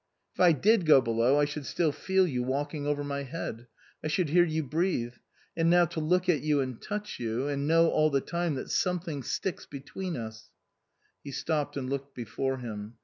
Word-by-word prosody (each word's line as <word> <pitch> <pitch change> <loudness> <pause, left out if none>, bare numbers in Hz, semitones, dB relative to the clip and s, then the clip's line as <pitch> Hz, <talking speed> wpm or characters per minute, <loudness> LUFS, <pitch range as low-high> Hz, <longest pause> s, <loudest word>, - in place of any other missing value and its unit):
" - - -51
If - - -23
I 180 -2 +7
did 190 - +3
go 150 -3 +8
below 120 +3 +2
I 145 - +4
should 150 0 -5
still 165 -3 +1
feel 190 +5 +2
you 130 -8 -1
walk 140 +4 -2
ing 145 -2 -4
over 145 0 0
my 140 0 -3
head. 125 -4 -6 0.4
I - - -1
should 160 +1 0
hear 175 +3 +5
you 160 -2 -1
breathe. 150 -5 -1 0.4
And 165 0 +2
now 175 0 +6
to 170 0 -5
look 180 +4 +1
at 165 -6 +3
you 150 -1 +2
and 130 -3 -3
touch 210 0 -5
you, 120 +3 -2
and 140 0 -1
know 165 +1 +5
all 155 0 +3
the 140 -2 +2
time 170 +1 -2
that 130 - -5
something 175 -6 -1
sticks 180 +7 -3
between 145 +7 -6
9) 115 -6 -4 0.9
He 145 - -7
stopped 150 +1 -2
and 130 -2 -3
looked 140 +1 -4
before 130 +3 -2
him. 110 -2 -7
145 Hz, 210 wpm, -29 LUFS, 130-170 Hz, 0.9 s, go